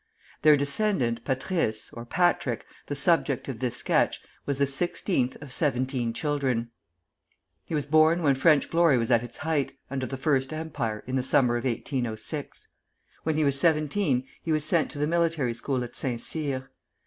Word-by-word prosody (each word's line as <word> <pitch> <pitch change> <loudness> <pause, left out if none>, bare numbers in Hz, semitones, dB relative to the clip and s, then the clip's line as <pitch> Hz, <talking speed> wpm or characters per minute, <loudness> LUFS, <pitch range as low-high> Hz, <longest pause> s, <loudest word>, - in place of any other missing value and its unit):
Their 150 0 +6
descendant, 140 - 0
Patrice 130 - -1
(or 115 0 -8
Patrick), 175 +8 0 0.2
the - - -3
subject - - +2
of - - -5
this - - -2
sketch, - - +1 0.3
was 140 -1 0
the 140 - +3
sixteenth 140 -1 0
of 135 -3 -9
seventeen 130 -4 0
children. 125 -2 -1 0.9
He 160 - -4
was 150 - -1
born 155 +3 +4
when 140 -3 +4
French 140 +2 +3
glory 165 -5 +4
was 115 +1 -1
at 115 -1 +5
its 120 -1 -8
height, 155 -3 -1 0.2
under 130 -2 -2
the 135 - -5
First 135 -1 0
Empire, 140 -9 -4
in 130 +1 -2
the - - +1
summer 125 -1 +3
of 120 - -3
1806. 125 +2 -3 0.5
When 160 - -1
he 155 - +2
was 140 -1 +4
seventeen 155 -3 +1 0.2
he 165 - -3
was 155 -1 +2
sent 160 -1 +2
to - - -9
the 145 - +1
military 165 -6 +1
school 130 +1 -2
at 120 - -8
Saint 125 -3 0
Cyr. 135 -2 -2
140 Hz, 170 wpm, -27 LUFS, 125-155 Hz, 0.9 s, Their